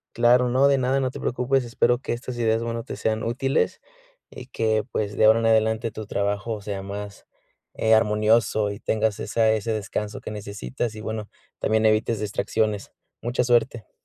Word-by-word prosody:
Claro. 120 +1 +4
No, 130 +3 +4
de 140 -1 +4
nada. 130 +1 +1
No 130 -1 -1
te - - -8
preocupes. 125 +2 0
Espero 120 +1 +1
que - - -3
estas 120 +1 -6
ideas, 115 -1 +1
bueno, 115 0 -3
te - - -7
sean 110 0 -1
útiles. 130 +4 0 0.5
Y 125 - -10
que, 110 -3 0
pues, 105 -1 -2
de 110 - +5
ahora 110 +1 +6
en 115 - -1
adelante, 110 +1 +2
tu 110 0 -7
trabajo 105 +2 -2
sea 100 -1 -4
más, 100 +1 -7 0.5
eh, 110 0 +2
armonioso, 110 0 +2
y 100 - -7
tengas 110 -2 0
esa 110 -1 +2
ese 110 +1 -1
descanso 105 0 -4
que - - -7
necesitas. 105 +3 -5
Y, 110 - -8
bueno, 110 -1 -5 0.3
también 110 0 +1
evites 110 0 +2
distracciones. 105 0 -1 0.3
Mucha 120 +2 0
suerte. 120 -1 +1
110 Hz, 180 wpm, -24 LUFS, 105-120 Hz, 0.5 s, ahora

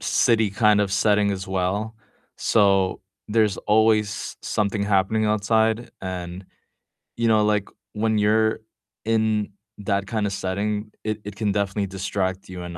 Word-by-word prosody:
city 115 -3 +2
kind 105 0 +3
of 100 -2 0
setting 105 +1 +2
as 95 -1 -4
well, 95 +4 -2 0.4
so 100 -3 +2 0.3
there's 105 -3 +2
always 105 -1 +1
something 105 0 -1
happening 100 +2 +1
outside, 110 +2 +1
and, 90 0 -6 0.7
you 115 - +1
know, 110 -1 +4
like, 105 -1 +1 0.2
when 110 0 0
you're 110 +1 +2 0.5
in 110 -2 +1 0.3
that 100 -1 -1
kinda 105 -3 -1
setting, 105 +2 -3
it 110 0 -3
it 105 -1 -8
can 105 -1 -1
definitely 100 0 -1
distract 95 0 -3
you, 90 -1 -7
and, 85 -1 -7
105 Hz, 135 wpm, -23 LUFS, 95-110 Hz, 0.7 s, know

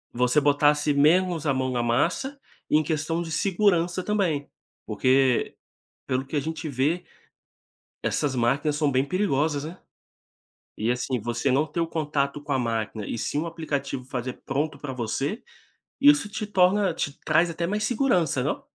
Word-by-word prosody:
você 125 +4 +3
botasse 145 +1 +3
menos 165 +2 +3
a 140 - +3
mão 130 0 -1
na 125 -1 0
massa, 175 - 0 0.3
em 155 +1 +4
questão 160 +1 -1
de 165 -1 -5
segurança 180 -1 +1
também, 180 -9 0 0.4
porque, 130 -1 +2 0.5
pelo 130 +1 -1
que 135 - -6
a - - +3
gente 160 +2 -4
vê, 150 +6 0 1.0
essas 140 -3 0
máquinas 140 +5 +1
são 150 -1 +1
bem 130 0 +3
perigosas, 150 -4 0
né. 165 +4 -8 1.0
E 110 +3 -1
assim, 125 +1 -1
você 120 +5 -1
não 140 +4 +2
ter 160 +2 -3
o 165 - +1
contato 150 -3 -2
com 145 0 -4
a 135 - +2
máquina 110 -3 -2
e - - -3
sim 145 - -2
o 165 - -3
aplicativo 140 -5 -4
fazer 125 0 -5
pronto 145 +2 -1
pra 140 -1 -6
você, 135 - -3 0.6
isso 285 -5 +5
te 215 +1 -4
torna 195 -1 +3
te 145 -2 -4
traz 165 +2 +3
até 170 +1 -2
mais 210 +4 -1
segurança, 215 - +1
não? 275 - -2
150 Hz, 165 wpm, -25 LUFS, 135-175 Hz, 1.0 s, isso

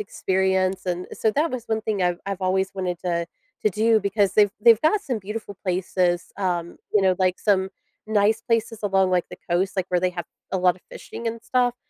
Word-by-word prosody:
experience, 190 -1 0
and 180 0 -2
so 220 - +1
that 300 +8 +1
was 245 -2 -5
one 220 0 0
thing 210 -3 -1
I've 175 -1 +1
I've 195 -1 -3
always 190 +1 0
wanted 180 -2 -2
to 170 -2 -1 0.4
to 215 - +3
do 220 +2 +3
because 200 -1 +1
they've 205 -2 +5
they've 230 0 +6
got 360 +7 +3
some 255 - -3
beautiful 210 +1 -6
places, 180 -1 0
um, 175 -3 -2
you 210 - +4
know, 190 -1 +4
like 185 -1 +1
some 190 -2 +1 0.4
nice 215 0 +3
places 230 -1 -1
along, 190 -2 +2
like, 180 -1 +1
the - - -9
coast, 185 +3 +1
like, 185 -2 0
where 180 - +2
they 185 0 +1
have 175 -1 -5 0.3
a 190 - +1
lot 180 -1 +3
of 185 - -22
fishing 235 - -8
and 230 0 -3
stuff, 245 0 +1
190 Hz, 210 wpm, -24 LUFS, 185-220 Hz, 0.4 s, they've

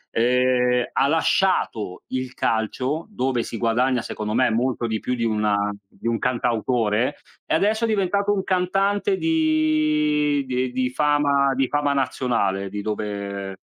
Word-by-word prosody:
Ehm, 125 +1 +2
ha 140 - +2
lasciato 160 - 0
il 130 0 -3
calcio 130 - -1
dove 130 - -1
si 115 - -6
guadagna 120 +2 +1
secondo 105 0 -4
me 125 -1 +3
molto 120 +1 0
di 110 -1 -2
più 125 - -2
di 115 - -3
una 105 -2 +1 0.2
di 115 - -8
un 115 -1 0
cantautore, 120 0 0 0.3
e - - 0
adesso 215 +6 +1
è - - 0
diventato 200 -1 +1
un 190 -2 -1
cantante 195 - +1
di 310 - +2
di 125 0 -1
ehm, 125 - -5
di 130 0 -1
fama 140 -1 +2
di 135 -1 +1
fama 145 -1 0
nazionale, 105 -8 -1
di 105 +1 -5
dove 100 -2 -4
130 Hz, 150 wpm, -23 LUFS, 115-155 Hz, 0.3 s, me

